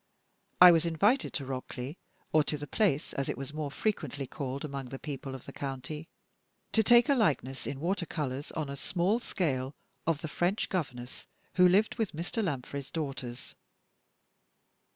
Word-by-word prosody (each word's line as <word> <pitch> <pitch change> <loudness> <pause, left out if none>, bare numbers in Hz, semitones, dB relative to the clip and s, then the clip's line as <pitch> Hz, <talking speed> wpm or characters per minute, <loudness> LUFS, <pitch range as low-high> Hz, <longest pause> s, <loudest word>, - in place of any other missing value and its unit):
I 180 0 +12
was 165 -2 +4
invited 205 - +3
to 140 - -3
Rockleigh 130 0 -5 0.4
or 155 -1 +6
to 150 - -1
"The 145 - -5
Place," 165 -4 +1
as 135 - -2
it - - -2
was 135 +1 -6
more 155 -2 -2
frequently 145 - -2
called 135 +1 -4
among 140 -2 -4
the 135 +2 -6
people 135 -2 -5
of 130 - -9
the - - -9
county 145 +4 -5 0.6
to 220 - +4
take 240 +2 +6
a 280 - +5
likeness 140 - +1
in 135 - -4
water 170 +2 0
colors, 145 -3 -3
on 155 -3 -2
a 140 - -4
small 185 - +1
scale, 140 - -1 0.3
of 165 -3 +1
the 165 - -3
French 175 +6 0
governess 130 -9 -4 0.3
who 180 -1 +7
lived 210 +6 +3
with 220 -4 0
Mr. 175 +8 -2
Lanfray's 140 -4 -3
daughters. 135 -6 -5
150 Hz, 170 wpm, -31 LUFS, 135-180 Hz, 0.6 s, I